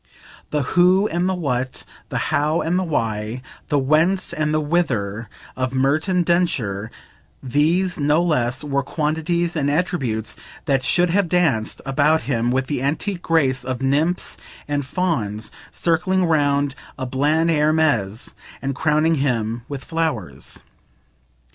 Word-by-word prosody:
The 150 -1 0
who 185 +3 +5
and 175 +3 0
the 190 - 0
what, 130 -6 -2 0.2
the - - -2 0.2
how 150 +3 +2
and 175 +3 +1
the - - 0
why, 115 - -2 0.2
the 145 - +1
whence 155 +8 +2
and 150 -1 0
the 155 - +2
whither 120 - -1 0.3
of 130 0 -2
Merton 155 +8 +2
Densher, 120 - 0 0.5
these, 160 +8 +1
no 150 +3 +3
less, 130 -6 0
were 140 -1 0
quantities 160 +4 -1
and 145 -3 +1
attributes 135 -9 -1 0.3
that 135 -4 +2
should 175 +6 +3
have 195 -1 +2
danced 160 -12 +1
about 145 +4 +2
him 120 -3 0
with 130 +1 +1
the 130 -1 -2
antique 170 +7 -1
grace 140 -7 +1
of 130 0 -4
nymphs 150 +7 +1 0.3
and 145 -2 -2
fauns 115 - -2 0.2
circling 180 +2 +1
round 145 -3 +2 0.2
a 130 - -3
bland 150 +6 +1
Hermes 150 -9 +1 0.3
and 135 0 -2
crowning 155 +3 +2
him 115 -4 -1
with 140 -2 -6
flowers. 145 - -3
150 Hz, 135 wpm, -21 LUFS, 130-165 Hz, 0.5 s, who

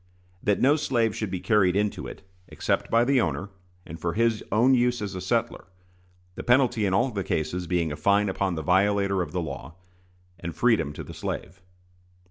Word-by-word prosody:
That 105 -1 +1
no 145 +4 +4
slave 115 -7 0
should 110 - -3
be 95 -1 -3
carried 95 -4 +2
into 105 0 -1
it, - - -10 0.2
except - - -2
by 115 +1 +3
the 135 -1 +3
owner, 85 +3 -2 0.3
and 80 +1 -9
for 85 -1 -1
his 115 +1 +1
own 120 +6 +4
use 125 -1 +2
as 105 -2 -4
a 90 - -5
settler; 95 - -1 0.7
the - - -6
penalty 120 -4 +3
in 95 - 0
all 125 +4 +2
the 100 -3 -3
cases 85 +2 -2
being 85 -2 0
a - - -3
fine 100 +7 +2
upon 95 -1 -1
the 80 - -4
violator 100 +2 +2
of 80 -4 -4
the 90 - -2
law, 70 0 -7 0.6
and 85 -1 -6
freedom 115 - +2
to - - -7
the - - -10
slave. 95 +2 -6
100 Hz, 195 wpm, -26 LUFS, 90-115 Hz, 0.7 s, no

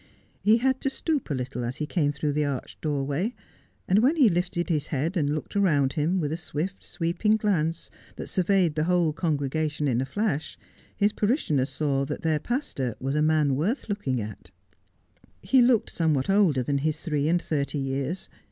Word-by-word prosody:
He 215 +2 +5
had 260 +2 +1
to 270 - +1
stoop 295 - -2
a 145 - 0
little 125 -1 -4
as 120 +2 -3
he 150 - -3
came 150 -2 +1
through 145 0 -2
the 150 +1 +1
arched 140 -3 -4
doorway; 145 - -1 0.5
and 190 +3 +4
when 265 +8 +4
he 275 -8 +6
lifted 175 -1 -1
his 155 -4 0
head 155 +6 -1
and 150 -3 +1
looked 155 - -6
round 150 -10 +2
him 165 +5 +1
with 150 -3 -1
a 160 - -2
swift 175 +3 -4
sweeping 175 +6 0
glance 170 -7 -1 0.2
that - - -6
surveyed 185 -3 +2
the 155 +1 0
whole 175 -3 +2
congregation 155 -1 -1
in 125 -2 +1
a 135 - -3
llash, 200 -9 -1 0.4
his 205 0 +3
parishioners 160 - +1
saw 140 -3 0
that - - -5
their 160 -2 +2
pastor 145 - -2
was 135 +1 -2
a 150 - +1
man 155 -3 +3
worth 195 - -1
looki 200 -11 -1
\g 115 - -1
at. 105 -3 -9 0.9
He 250 +8 +4
looked 240 -2 +3
somewhat 155 -6 +1
olde^ 185 -11 +3
than 140 -1 0
his 155 +2 -1
three 150 -4 0
and 175 +1 +3
thirty 150 -3 -2
years. 135 +6 -2
155 Hz, 190 wpm, -26 LUFS, 140-190 Hz, 0.9 s, he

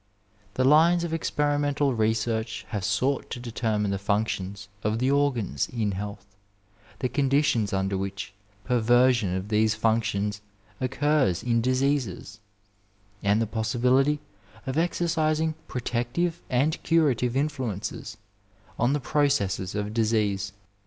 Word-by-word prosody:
The 130 - +1
lines 165 +5 +5
of 170 - -3
experi 150 -2 0
mental 145 -1 +1
research 110 0 -1
have 105 -4 -3
sought 115 +8 0
to 120 - -5
determine 110 -4 -1
the 100 - -1
functions 100 -1 -2 0.2
of 105 +1 0
the 130 +3 +1
organs 125 - 0
in 110 -4 -1
health, 100 +1 -6 0.8
the 130 - +1
conditions 135 -6 +1
under 95 0 0
which 95 0 -5 0.3
per* 125 -1 +1
version 120 -4 +3
of 95 +2 -4
these 110 0 +2
functions 110 -2 0 0.4
occurs 135 - +1
in 115 -1 +2
diseases, 130 -3 -1 0.8
and 100 +2 +2
the 115 - +1
possi 110 +3 -2
bility 135 +4 +3 0.5
of 130 - -3
exercising 160 -1 +1
protective 125 +8 -2
and 140 +5 +1
curative 135 -7 +2
influences 130 -9 -3 0.6
on 120 +4 +3
the 145 - +1
processes 135 -10 0
of 105 0 -3
disease. 105 -3 +1
120 Hz, 125 wpm, -26 LUFS, 105-140 Hz, 0.8 s, lines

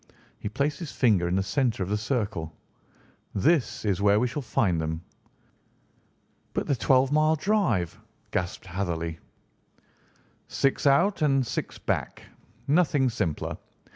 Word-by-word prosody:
He - - -4
placed 140 +7 -1
his 165 -4 -6
finger 105 -9 +3
in 90 - 0
the 95 - +1
centre 120 -3 0
of 90 - -5
the 105 - +1
circle. 105 - -2 0.8
"This 140 - +1
is 100 -2 0
where 100 +1 +4
we 125 - +2
shall 140 +4 -4
find 95 -9 +1
them." 80 +1 -3 1.5
"But - - 0
the 140 - +1
twelve 130 +2 +3
mile 155 +1 +4
drive?" 170 - 0 0.3
gasped 90 +1 -3
Hatherley. 85 -3 -3 1.3
"Six 135 +1 +1
out 170 +9 +3
and 135 -3 +3
six - - -4
back. - - -3 0.4
Nothing 145 -4 +3
simpler. 95 -10 -2
115 Hz, 135 wpm, -27 LUFS, 90-140 Hz, 1.5 s, where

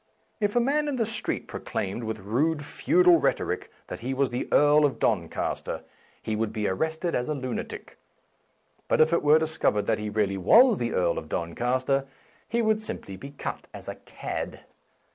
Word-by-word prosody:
If 205 0 0
a - - +5
man 290 +5 +1
in 290 - -1
the 230 -3 +1
street 225 - -2
pro - - -6
claimed, 100 +5 -3
with 110 0 -3
rude 145 +10 0
feudal 355 - +4
rhetoric, - - -1 0.2
that - - -7
he 130 +3 -3
was 135 -1 +1
the 120 - -3
Earl 150 +1 +5
of 145 -3 +2
Doncaster, 85 -8 -1 0.4
he 110 - -3
would 110 0 -1
be 110 -1 -2
arrested 160 - -1
as 125 +3 -1
a 150 - 0
lunatic; 130 -3 -6 0.9
but - - +2
if 155 +1 +5
it 170 - +3
were 150 +1 +6
discov 160 0 +1
ered 105 -1 0
that 110 0 +1
he 105 0 -3
really 100 -2 0
was 230 - +6
the 120 -1 -1
Earl 85 -2 +1
of 80 - -12
Don 85 0 -3
caster, 130 +4 0 0.4
he 235 +1 +1
would 220 0 +2
simply 100 - -6
be 140 +8 -9
cut 140 - -6
as - - -10
a - - -3
cad. - - -6
135 Hz, 195 wpm, -26 LUFS, 110-170 Hz, 0.9 s, were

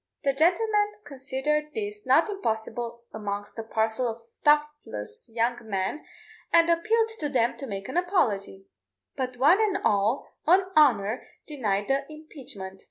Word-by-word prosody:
The 275 -1 +2
gentleman 415 +7 +2
considered 290 +2 -2
this 420 -1 -5
not - - +5
impossible 235 - -3
amongst 205 0 -5
a - - -3
parcel 220 +2 0
of 230 0 -5 0.2
thoughtless 295 - 0
young 235 +1 0
men, 195 +9 -2 0.5
and 335 0 +5
appealed 445 +7 +2
to 295 - -1
them 240 -4 +1
to 275 - -6
make 195 -3 -5
an - - -3
apology; 215 - 0 0.5
but 255 -1 -3
one 310 - +5
and 410 -3 +2
all, 210 +5 +2 0.2
on 370 +3 +4
honour, 235 -7 +4 0.2
denied 210 -9 -1
the 275 +2 0
impeachment. 255 -12 -9
270 Hz, 140 wpm, -27 LUFS, 220-330 Hz, 0.5 s, not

